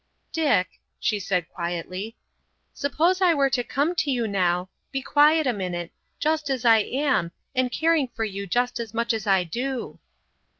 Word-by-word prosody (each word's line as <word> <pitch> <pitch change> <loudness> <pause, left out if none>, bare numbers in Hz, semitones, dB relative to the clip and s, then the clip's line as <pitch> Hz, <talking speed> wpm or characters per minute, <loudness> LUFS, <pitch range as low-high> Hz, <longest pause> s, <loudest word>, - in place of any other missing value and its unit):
"Dick," 250 - +1 0.2
she 210 - 0
said 180 -3 -1
quietly, 180 +5 -5 0.6
"suppose 335 +6 +1
I 350 -3 +5
were 275 -2 +2
to 250 -2 +1
come 285 +8 0
to 320 -3 +1
you 240 -4 0
now,—be 185 +7 -2
quiet 300 +2 +4
a 250 - +2
minute,—just 200 - -3
as 260 -3 -2
I 225 -1 +7
am, 260 - 0 0.2
and 255 -1 +1
caring 320 -1 +2
for 225 -2 -4
you 200 -2 -4
just 245 +5 0
as 230 -1 -6
much 235 +1 +1
as 220 -1 -4
I 190 -2 +4
do." 245 +9 -4
240 Hz, 160 wpm, -25 LUFS, 195-285 Hz, 0.6 s, I